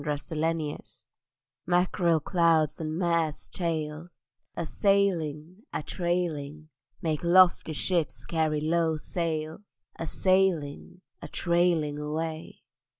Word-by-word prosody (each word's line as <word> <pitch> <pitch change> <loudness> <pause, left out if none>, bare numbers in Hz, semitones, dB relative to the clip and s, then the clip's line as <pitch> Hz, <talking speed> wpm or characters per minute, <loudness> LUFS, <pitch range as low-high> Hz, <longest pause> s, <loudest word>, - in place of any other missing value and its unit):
MACKEREL 150 0 -1
SIGNS 160 0 -3 0.6
Mackerel 175 -2 +2
clouds 165 -2 +2
and 155 0 -3
mares' 170 -3 0
tails 160 -1 -3 0.5
A 170 - -2
sailing, 175 -4 0
a - - -3
trailing, 155 -4 -2 0.3
Make 155 -2 -1
lofty 175 -2 +5
ships 170 +1 -1
carry 155 -2 0
low 160 0 +1
sails 160 0 -3 0.4
A 165 - -4
sailing, 180 -3 0 0.2
a - - -7
trailing 170 -4 +1
away. 155 -1 -4
165 Hz, 100 wpm, -28 LUFS, 155-175 Hz, 0.6 s, lofty